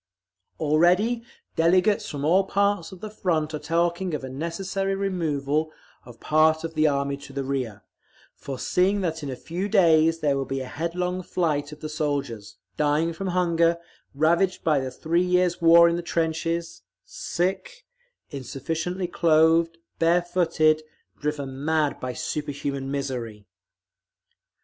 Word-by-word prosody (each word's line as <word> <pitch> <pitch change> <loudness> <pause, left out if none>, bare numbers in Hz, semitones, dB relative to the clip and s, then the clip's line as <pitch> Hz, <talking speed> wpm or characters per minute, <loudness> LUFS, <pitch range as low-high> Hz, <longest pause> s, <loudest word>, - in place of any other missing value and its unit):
Already 180 +10 +3 0.3
delegates 185 +5 +3
from 145 -1 -4
all 185 +5 +4
parts 200 -3 0
of 190 - -12
the 215 - -5
Front 160 -7 -1
are 150 - -3
talking 170 +3 0
of 140 - -6
a 130 - -5
necessary 190 +6 -2
removal 155 -6 -1 0.4
of 120 -2 -13
part 155 +1 +3
of 165 0 -4
the 155 -1 +3
Army 140 -1 0
to 140 - -12
the 140 0 -2
rear, 125 -7 -3 0.5
foreseeing 180 +10 0
that 160 -3 -2
in 145 - -5
a 130 - -4
few 180 +9 -4
days 165 -5 +4
there 145 -2 +2
will 135 0 -1
be 135 +1 -3
headlong 170 +7 -3
flight 155 -5 -1
of 150 - -11
the 155 - -4
soldiers, 140 -8 -3 0.2
dying 150 +3 +1
from 195 +4 -5
hunger, 170 -2 +2 0.4
ravaged 170 +5 +2
by 155 -3 +3
the 130 -1 -3
three 160 +6 0
years' 180 -1 +1
war 170 0 +8
in 170 0 +1
the - - -2
trenches, 165 0 -2 0.2
sick, 190 - -3 0.5
insufficiently 160 +7 -4
clothed, 165 0 +3 0.2
bare 170 +2 +3
footed, 165 -3 +2 0.4
driven 140 -2 -4
mad 155 -2 +1
by 130 - -3
superhuman 140 0 -4
misery." 125 -7 -4
160 Hz, 140 wpm, -25 LUFS, 145-175 Hz, 0.5 s, war